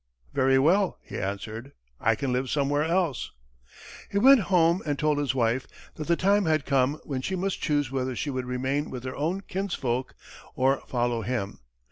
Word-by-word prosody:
"Very 135 0 +3
well," 180 +8 +3
he - - -6
answered, 110 +6 -5 0.3
"I 115 +1 +2
can 130 +2 -2
live 130 +1 -1
somewhere 145 0 +1
else." 165 -4 0 0.8
He 200 - -2
went 265 +5 +7
home 175 -1 +4
and 145 -2 -2
told 150 0 +1
his 140 -2 0
wife 120 +1 +1 0.3
that 155 - -6
the 170 - +3
time 200 +2 +2
had 155 -3 +1
come 140 +1 +1
when 135 -3 -3
she 190 +8 -2
must 190 +1 -2
choose 145 -4 0
whether 130 -1 -2
she 145 +4 -2
would 130 -1 -3
remain 130 +4 -1
with 125 -2 -6
her 130 0 -5
own 170 +7 -1
kinsfolk 145 -11 -3 0.4
or 135 +1 +2
follow 120 -2 0
him. 110 -3 -3
140 Hz, 180 wpm, -27 LUFS, 125-165 Hz, 0.8 s, went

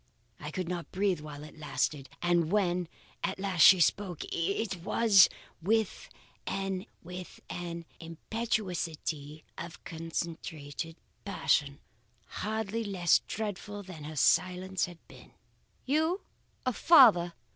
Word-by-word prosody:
I 150 - -6
could 180 +2 -3
not 175 -4 -4
breathe 190 -3 +1
while 150 -1 -8
it 155 +1 -12
lasted; 150 -2 -1
and 175 -2 +2
when 180 -4 +1 0.4
at 195 - -1
last 190 -3 -1
she 190 +3 +9
spoke, 180 0 +1
it 195 +3 -1
was 195 +2 +5 0.3
with 220 - 0 0.4
an 195 +1 -2 1.1
impetuosity 165 -5 -3 0.2
of 170 0 -8
concentrated 165 -1 -5 0.3
passion, 145 -8 +1 0.4
hardly 220 +1 -3
less 185 -5 +3
dreadful 205 -1 -4
than 175 -6 -9
her 155 +1 -7
silence 185 +4 +2
had 175 -1 -11
been. - - -15 0.5
"'You 320 +7 +1 0.4
a 255 - +1
father! 210 - +7
180 Hz, 110 wpm, -30 LUFS, 165-205 Hz, 1.1 s, she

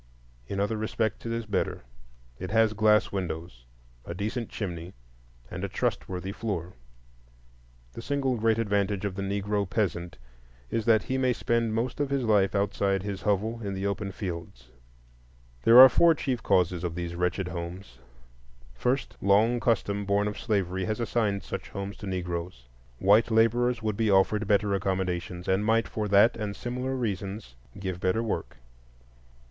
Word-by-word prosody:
In 100 - -3
other 105 +2 0
respects 110 0 -2
it - - -2
is 115 0 -2
better; 100 -10 -2 0.6
it 95 - -5
has 110 +1 +3
glass 105 0 +3
windows, 80 -9 -5 0.4
a 85 - -6
decent 110 +5 -3
chimney, 90 -4 -5 0.6
and - - -5
a - - -2
trustworthy 95 +1 -2
floor. 95 -5 -4 1.2
The - - -7
single 135 0 0
great 115 -1 +2
advantage 100 -2 0
of 100 - -2
the 100 - -5
Negro 100 0 -1
peasant 90 -4 -2 0.5
is 115 - -1
that 110 -3 +4
he 130 0 -2
may 130 -1 +2
spend 115 -2 0
most 120 +4 -2
of 145 -2 0
his 140 -2 0
life 105 -3 +3
outside 100 -1 0
his 100 -2 -4
hovel, 110 +3 0
in 100 -1 -3
the 95 +1 -3
open 100 0 -2
fields. 85 - -7 1.0
There 115 +2 +9
are 130 - +13
four 165 +6 +4
chief 130 -5 -2
causes 90 -1 +1
of 85 -2 -3
these 85 -1 -4
wretched 90 +1 -1
homes: 85 -5 -7 0.7
First, 125 - -1
long 110 +5 +3
custom 100 -3 0
born 100 +1 +1
of 105 - -4
slavery 95 -4 -1
has 110 +1 -2
assigned 110 -3 0
such - - -6
homes 100 +1 -5
to 105 - -8
Negroes; 90 -7 -4 0.3
white 105 - +4
laborers 115 +1 +2
would 105 -2 -1
be 110 -2 +1
offered 105 +2 +3
better 100 0 +2
accommodations, 90 -2 -2
and 95 +2 +2
might, 115 +1 +2
for 105 -1 -3
that 100 +4 +5
and 105 -2 -4
similar 125 +2 -3
reasons, 100 - -4 0.2
give 95 -2 -4
better 95 +6 +1
work. 110 - -4
100 Hz, 160 wpm, -27 LUFS, 95-115 Hz, 1.2 s, are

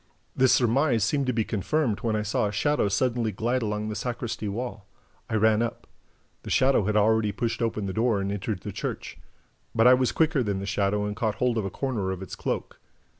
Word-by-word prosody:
This 130 -1 +4
surmise 125 -1 +3
seemed 140 +2 0
to - - +3
be 115 -2 0
confirmed 115 - -1
when 115 -3 -1
I 105 - 0
saw 105 0 0
a - - -3
shadow 145 +3 +1
suddenly 115 +2 0
glide 120 +6 -1
along 105 -1 -2
the 105 - -4
sacristy 120 -2 -4
wall. 110 -1 -5 0.4
I - - -1
ran 110 0 +3
up. 115 0 -3 0.6
The - - -9
shadow 130 -6 +3
had 105 +1 +1
already 110 0 +3
pushed 115 +4 -2
open 110 -3 -1
the 95 - -3
door 110 -1 +1
and 100 0 -2
entered 100 -1 -3
the 105 - -6
church. 100 - -5 0.6
But 115 0 +4
I 125 - +9
was 130 -1 +2
quicker 160 -3 +2
than 100 -4 -1
the 95 - -4
shadow 100 +1 0
and 105 0 -3
caught 110 -1 -1
hold 125 +1 +1
of 105 - -2
a - - -2
corner 115 -5 -2
of 95 0 -4
its - - -7
cloak. - - -4
110 Hz, 220 wpm, -26 LUFS, 105-125 Hz, 0.6 s, I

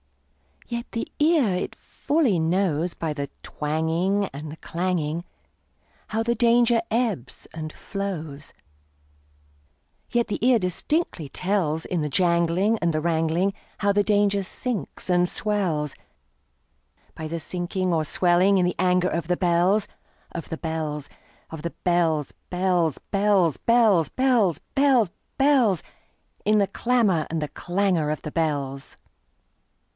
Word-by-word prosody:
Yet 235 0 -5
the 230 - -3
ear 300 -6 +4
it 180 - -3
fully 285 - 0
knows, 170 0 +1
By 160 -2 -3
the 140 -2 -4
twangingAnd 160 +1 -1
the 150 - -7
clanging, 170 -2 -2 0.8
How 225 +1 -1
the 235 +1 +1
danger 235 0 +4
ebbs 220 - -2
and 155 -1 -5
flows; 160 -8 -5 1.6
Yet 235 -1 +1
the 210 - -4
ear 250 -1 +5
distinctly 185 - -1
tells, 180 -4 -1
In 175 -3 -1
the 150 - -1
janglingAnd 170 +4 +2
the 155 - 0
wrangling, 165 +3 +1 0.3
How 200 -1 +2
the 205 +1 +3
danger 205 -1 +2
sinks 240 +4 -4
and 180 0 +3
swells,—By 150 - -5
the 165 +1 -4
sinking 180 +2 -2
or 160 - +2
the - - -3
swelling 180 +5 +3
in 180 - +3
the 180 - 0
anger 180 0 +3
of 165 -1 -2
the 180 0 +1
bells, 180 +3 +2 0.4
Of 170 - -6
the 160 - -4
bells, 155 -3 -4 0.4
Of 160 -2 -7
the 170 - -2
bells, 165 -4 +1 0.2
bells, 180 -4 +1
bells, 195 -6 +2
bells, 220 -8 +4
Bells, 240 - +2 0.2
bells, 265 -9 +3 0.3
bells—In 235 - 0
the 200 - +3
clamor 210 -6 +1
and 165 - -2
the 150 - -3
clangor 175 -4 0
of 150 - -3
the 150 - -5
bells! 140 -4 -2
180 Hz, 130 wpm, -24 LUFS, 160-205 Hz, 1.6 s, ear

